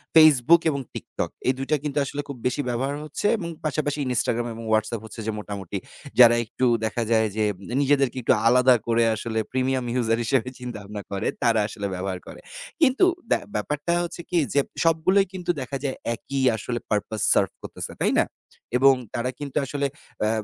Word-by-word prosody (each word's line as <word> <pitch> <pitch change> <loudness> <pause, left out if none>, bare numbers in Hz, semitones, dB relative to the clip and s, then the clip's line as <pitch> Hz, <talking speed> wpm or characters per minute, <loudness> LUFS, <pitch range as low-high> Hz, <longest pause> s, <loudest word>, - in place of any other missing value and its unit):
Facebook 155 +1 +7
এবং 140 -2 -1
TikTok। - - -4 0.2
এই 130 - +4
২ 135 - -3
টা - - +5
কিন্তু 150 -1 -3
আসলে 145 +2 -4
খুব 140 -3 -7
বেশি 145 - -1
ব্যবহার 135 +4 -1
হচ্ছে 155 +6 -5
এবং 170 -5 -5 0.2
পাশাপাশি 150 -1 -1
Instagram 120 +1 0
এবং 115 - -8
Whatsapp 110 0 0
হচ্ছে 110 +1 -10
যে - - +1
মোটামুটি 100 -2 -5 0.4
যারা 120 -1 +9
একটু 130 - -2 0.2
দেখা 115 +2 -1
যায় 110 -1 +4
যে 110 - +1 0.4
নিজেদেরকে 135 -2 +2
একটু 120 - +4
আলাদা 125 +1 +6
করে 115 0 +3
আসলে 110 +1 -3
premium 130 0 0
user 115 -1 +1
হিসেবে 130 +1 +1
চিন্তাভাবনা 105 -4 -7
করে 100 +2 -2 0.2
তারা 115 -2 +4
আসলে 105 -1 -4
ব্যবহার 95 0 -3
করে। - - -10 0.4
কিন্তু 280 +3 +5 0.2
ব্যা - - +3 0.2
ব্যাপারটা 150 +3 -1
হচ্ছে 175 0 -6
কি? 180 - +1 0.2
যে 140 - +4 0.2
সবগুলোই 165 +4 +3
কিন্তু 180 -2 -1
দেখা 135 +2 -4
যায় 135 -2 -1 0.2
একই 135 +4 -4
আসলে 120 +2 -3
purpose 105 0 -1
serve - - +2
করতেছে। - - -6
তাই - - +3
না? - - +4 0.5
এবং 135 +1 +7 0.2
তারা 120 +2 -1
কিন্তু 145 -2 -5
আসলে 140 +1 -1 0.4
এ - - +2
125 Hz, 180 wpm, -24 LUFS, 110-145 Hz, 0.5 s, যারা